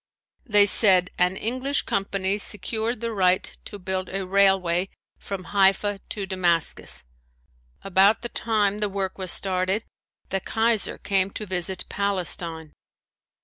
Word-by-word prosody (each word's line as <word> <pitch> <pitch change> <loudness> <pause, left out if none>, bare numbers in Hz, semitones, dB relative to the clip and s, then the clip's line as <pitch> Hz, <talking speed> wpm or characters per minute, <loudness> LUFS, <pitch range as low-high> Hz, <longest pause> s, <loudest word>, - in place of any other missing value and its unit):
They 205 -2 +5
said 185 -3 +7
an 180 +1 +1
English 255 +6 -2
company 195 0 -2
secured 220 +3 -1
the 230 0 -3
right 185 -2 0
to 205 - -9
build 185 -1 -4
a 195 0 -4
railway 190 -2 +1 0.3
from 195 -2 -7
Haifa 200 +1 +1
to 200 -2 -5
Damascus. 180 -4 0 0.8
About 195 +4 +2
the 240 - -4
time 210 -3 -1
the 210 -1 -1
work 195 -1 -5
was 185 -2 -1
started 190 +2 +1 0.5
the 195 - -2
Kaiser 225 +1 -1
came 195 -1 0
to 210 - -7
visit 185 0 -3
Palestine. 175 -5 -1
195 Hz, 130 wpm, -23 LUFS, 185-205 Hz, 0.8 s, said